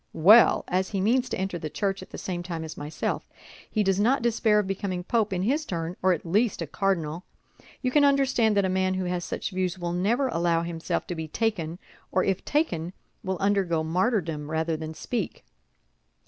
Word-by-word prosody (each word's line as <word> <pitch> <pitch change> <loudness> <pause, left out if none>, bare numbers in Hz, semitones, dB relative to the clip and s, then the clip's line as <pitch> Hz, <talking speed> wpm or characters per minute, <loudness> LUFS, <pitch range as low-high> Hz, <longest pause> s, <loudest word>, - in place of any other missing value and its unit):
Well, 210 +9 +7
as 185 +1 0
he 195 - -2
means 245 +6 +2
to - - -2
enter 190 -2 -2
the 155 - -4
Church 195 +3 -2
at - - -11
the - - -8
same 175 -2 -4
time 170 -2 -5
as 160 - -7
myself, 150 +1 -4 0.4
he 215 - +1
does 195 0 +1
not 240 +4 +3
despair 225 -2 +3
of 210 - +2
becoming 190 -2 -3
Pope 215 +1 +1
in 185 -1 -1
his 285 +9 +1
turn, 170 - -4
or 185 - +4
at 175 -2 -1
least 210 +6 +1
a 165 - -2
cardinal. 170 -1 -1 0.6
You 255 - +1
can 295 +2 +4
understand 265 -6 +3
that 200 - +3
a - - +2
man 185 0 +1
who 185 -1 -2
has 180 0 -2
such - - -4
views 185 -1 -1
will 175 -1 -3
never 225 +10 +1
allow 170 -3 +1
himself 170 -1 -3
to - - -4
be 160 -2 -5
taken, 170 -4 -2 0.3
or 185 - +2
if 195 -1 0
taken, 180 - -1 0.3
will 190 -1 -2
undergo 190 -4 +1
martyrdom 165 -4 0
rather 160 +1 0
than 155 0 -6
speak." 225 0 -4
185 Hz, 205 wpm, -26 LUFS, 170-210 Hz, 0.6 s, Well